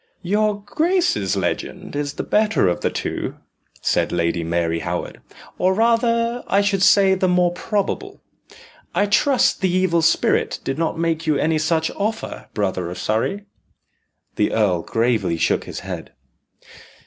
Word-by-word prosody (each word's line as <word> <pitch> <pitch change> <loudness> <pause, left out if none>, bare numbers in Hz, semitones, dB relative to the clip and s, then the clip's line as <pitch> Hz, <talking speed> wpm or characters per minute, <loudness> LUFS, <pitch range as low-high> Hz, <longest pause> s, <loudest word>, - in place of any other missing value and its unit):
"Your 205 +2 0
grace's 315 - +1
legend 95 - -3
is 145 -1 -2
the - - -4
better 215 - +2
of 90 - 0
the - - +1
two," - - -4 0.5
said - - +1
Lady 85 0 0
Mary 85 0 0
Howard, - - -4 0.4
"or 185 +1 +2
rather, 230 +1 +2
I 200 - +3
should 200 -2 0
say, 195 -1 +5
the 185 0 +1
more 180 -1 +3
probable. 200 +2 -3 0.8
I 205 - +3
trust 245 +6 +2
the 190 - +2
evil 180 -2 +2
spirit 160 +1 +2
did 135 +3 -3
not 165 -1 -1
make 165 -1 -1
you 150 -2 +3
any 155 +2 +1
such 160 +1 0
offer, 220 +2 -4
brother 95 -4 -1
of 90 - -7
Surrey?" 115 - -1 0.9
The - - +1
earl 100 -6 +2
gravely 110 -5 0
shook - - +1
his - - -7
head. - - -7
170 Hz, 150 wpm, -21 LUFS, -, 0.9 s, say